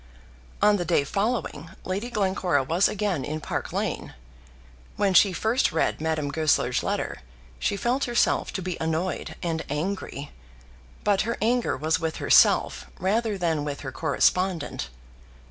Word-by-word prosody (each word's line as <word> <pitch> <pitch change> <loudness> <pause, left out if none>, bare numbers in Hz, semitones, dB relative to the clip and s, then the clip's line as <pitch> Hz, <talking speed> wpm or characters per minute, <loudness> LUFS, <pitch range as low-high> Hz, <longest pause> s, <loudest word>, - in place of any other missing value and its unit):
On 210 0 +5
the 175 - -1
day 155 - +2
following, 195 - -2 0.2
Lady 200 +6 -3
Glencora 190 - +1
was 170 +8 +3
again 200 -8 -1
in 155 +4 -3
Park - - -4
Lane. - - -3 0.8
When 200 -2 +1
she 195 +1 +6
first 220 +7 +1
read 160 - 0
Madame 155 -3 -1
Goesler's 145 -5 +2
letter, - - -2 0.4
she 200 - 0
felt 250 +6 0
herself 240 -2 +1
to 190 - -3
be 180 -1 -3
annoyed 160 +3 -2
and 165 -2 -1
angry, 150 -2 -3 0.7
but 205 -2 +3
her 230 +2 -2
anger 235 - +1
was 155 +3 +1
with 160 -1 -2
herself - - +4
rather 210 +3 0
than 165 -5 0
with 145 -1 -4
her 135 - -5
correspondent. 160 - 0
180 Hz, 145 wpm, -26 LUFS, 155-205 Hz, 0.8 s, she